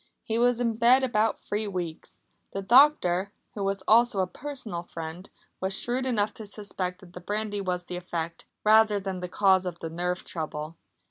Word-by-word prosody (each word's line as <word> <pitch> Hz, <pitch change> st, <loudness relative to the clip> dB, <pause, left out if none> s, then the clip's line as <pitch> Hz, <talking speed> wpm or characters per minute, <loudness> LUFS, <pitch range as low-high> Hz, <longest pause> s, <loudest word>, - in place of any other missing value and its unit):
He 225 Hz, 0 st, -1 dB
was 245 Hz, 0 st, +3 dB
in 230 Hz, -2 st, 0 dB
bed 245 Hz, +3 st, +6 dB
about 225 Hz, -3 st, +1 dB
three 210 Hz, +1 st, -3 dB
weeks. 175 Hz, -5 st, -6 dB, 0.3 s
The 195 Hz, -, -3 dB
doctor, 205 Hz, -6 st, +5 dB, 0.2 s
who 205 Hz, -, -4 dB
was 195 Hz, -1 st, -1 dB
also 230 Hz, -1 st, +5 dB
a -, -, +2 dB
personal 240 Hz, -5 st, -6 dB
friend, 165 Hz, +2 st, -8 dB, 0.3 s
was 190 Hz, +1 st, -1 dB
shrewd 255 Hz, +2 st, -1 dB
enough 210 Hz, -4 st, +1 dB
to 220 Hz, -, -9 dB
suspect 195 Hz, -3 st, -5 dB
that 180 Hz, -2 st, -15 dB
the 180 Hz, -, -9 dB
brandy 205 Hz, +1 st, -2 dB
was 180 Hz, -2 st, -2 dB
the 180 Hz, -, -5 dB
effect, 170 Hz, -2 st, -5 dB, 0.2 s
rather 215 Hz, -1 st, +5 dB
than 190 Hz, -1 st, -4 dB
the 180 Hz, 0 st, -5 dB
cause 190 Hz, 0 st, +4 dB
of 175 Hz, -1 st, -4 dB
the 165 Hz, -, -6 dB
nerve 180 Hz, +2 st, -2 dB
trouble. 155 Hz, -1 st, -5 dB
195 Hz, 185 wpm, -27 LUFS, 180-220 Hz, 0.3 s, bed